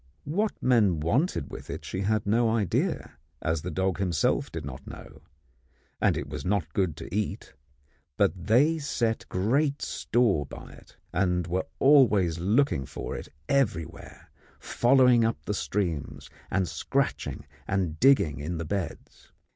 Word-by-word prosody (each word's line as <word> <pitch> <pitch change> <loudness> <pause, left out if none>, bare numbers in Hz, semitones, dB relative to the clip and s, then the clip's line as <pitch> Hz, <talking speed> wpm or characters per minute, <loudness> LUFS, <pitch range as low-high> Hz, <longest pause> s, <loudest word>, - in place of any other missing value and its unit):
What 205 +9 0
men 105 -10 +3
wanted 115 - 0
with - - -9
it - - -6
she 95 - -4
had 105 +1 0
no 115 +3 +2
idea, 105 -10 -1 0.2
as 80 0 -1
the 90 - -4
dog 95 +2 -1
himself 90 -5 0
did 80 -3 -5
not 70 -1 -8
know, - - -11 0.8
and - - +3
it - - -4
was 75 0 -6
not 90 -5 -1
good 90 -6 0
to - - -7
eat; 105 -1 -3 0.6
but - - +3
they 145 +9 +4
set 115 -6 -1
great 140 +10 +1
store 105 - +1
by - - -10
it, - - -17 0.2
and 90 -1 +1
were 90 +3 -2
always 105 - +4
looking 95 - +1
for - - -6
it - - -7 0.2
everywhere, 85 - -2 0.3
following 125 -1 +4
up 115 0 +1
the 105 - -1
streams 90 -8 -3 0.2
and 95 -2 0
scratching 80 -2 -2 0.2
and 90 -5 -1
digging 80 - +4
in 80 +4 -4
the 85 - -4
beds. 95 -1 -5
95 Hz, 145 wpm, -27 LUFS, 85-120 Hz, 0.8 s, they